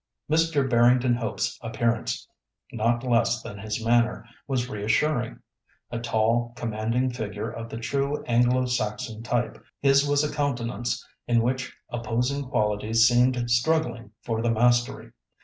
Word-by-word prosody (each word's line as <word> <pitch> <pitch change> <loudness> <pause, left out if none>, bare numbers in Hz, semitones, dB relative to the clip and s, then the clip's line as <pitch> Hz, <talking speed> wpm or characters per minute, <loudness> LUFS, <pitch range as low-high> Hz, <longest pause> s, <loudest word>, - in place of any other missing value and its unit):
Mr. 155 -3 +2
Barrington 120 +1 +4
Hope's 120 -2 -2
appearance, 115 0 -1 0.5
not 120 +1 +1
less 120 -1 +2
than 100 - -8
his 110 +2 -4
manner, 120 0 +2 0.2
was 130 -3 -1
reassuring. 120 +4 0 0.5
A 120 - -3
tall, 115 +1 +1
commanding 115 +2 -1
figure 110 -4 -4
of 115 0 -7
the 115 - -6
true 140 +5 -1
Anglo 120 +2 +2
Saxon 110 -2 -2
type, 120 0 -2 0.2
his 140 0 +4
was 145 0 +2
a 150 - -2
countenance 120 -5 -2 0.2
in 115 -1 +3
which 125 +1 -2
opposing 120 +4 -1
qualities 110 -2 +2
seemed 125 +1 +3
struggling 120 -3 +1
for 115 -1 -2
the 120 - +1
mastery. 120 +1 +1
120 Hz, 130 wpm, -26 LUFS, 115-125 Hz, 0.5 s, Barrington